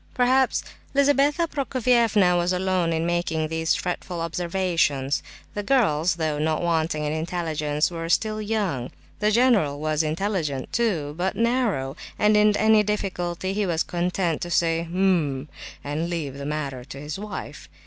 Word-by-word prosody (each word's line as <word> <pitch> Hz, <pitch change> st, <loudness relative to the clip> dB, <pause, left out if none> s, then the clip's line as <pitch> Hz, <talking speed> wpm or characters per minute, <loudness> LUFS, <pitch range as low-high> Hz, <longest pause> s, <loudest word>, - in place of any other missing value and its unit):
Perhaps 255 Hz, +1 st, +3 dB, 0.3 s
Lizabetha 285 Hz, +3 st, +3 dB
Prokofievna 235 Hz, -, +2 dB
was 175 Hz, +1 st, +1 dB
alone 185 Hz, -2 st, +1 dB
in 165 Hz, 0 st, 0 dB
making 170 Hz, -2 st, 0 dB
these 160 Hz, 0 st, +1 dB
fretful 180 Hz, -1 st, -4 dB
observations; 165 Hz, -5 st, 0 dB, 0.3 s
the 205 Hz, -, -2 dB
girls, 190 Hz, -, +2 dB
though 155 Hz, -3 st, -1 dB
not 155 Hz, +2 st, 0 dB
wanting 160 Hz, -2 st, 0 dB
in 150 Hz, -, -1 dB
intelligence, 155 Hz, -2 st, -1 dB
were 165 Hz, -1 st, -5 dB
still 215 Hz, +4 st, +1 dB
young; 200 Hz, -, -1 dB, 0.3 s
the 210 Hz, +1 st, +2 dB
general 215 Hz, -, +3 dB
was 155 Hz, 0 st, 0 dB
intelligent, 155 Hz, -4 st, -2 dB
too, 170 Hz, -12 st, 0 dB
but 190 Hz, +2 st, 0 dB
narrow, 230 Hz, -, 0 dB, 0.2 s
and 210 Hz, 0 st, +4 dB
in 210 Hz, 0 st, +4 dB
any 220 Hz, 0 st, +5 dB
difficulty 190 Hz, -3 st, -2 dB
he 205 Hz, -1 st, 0 dB
was 165 Hz, -2 st, +1 dB
content 175 Hz, -1 st, -1 dB
to 175 Hz, -, -3 dB
say, 165 Hz, -1 st, +2 dB
"H'm!" 170 Hz, -7 st, +1 dB, 0.4 s
and 150 Hz, +4 st, -2 dB
leave 160 Hz, -6 st, -3 dB
the 140 Hz, 0 st, -6 dB
matter 140 Hz, -4 st, -3 dB
to 135 Hz, +1 st, -9 dB
his 150 Hz, +5 st, -6 dB
wife. 210 Hz, 0 st, -7 dB
175 Hz, 150 wpm, -24 LUFS, 155-210 Hz, 0.4 s, any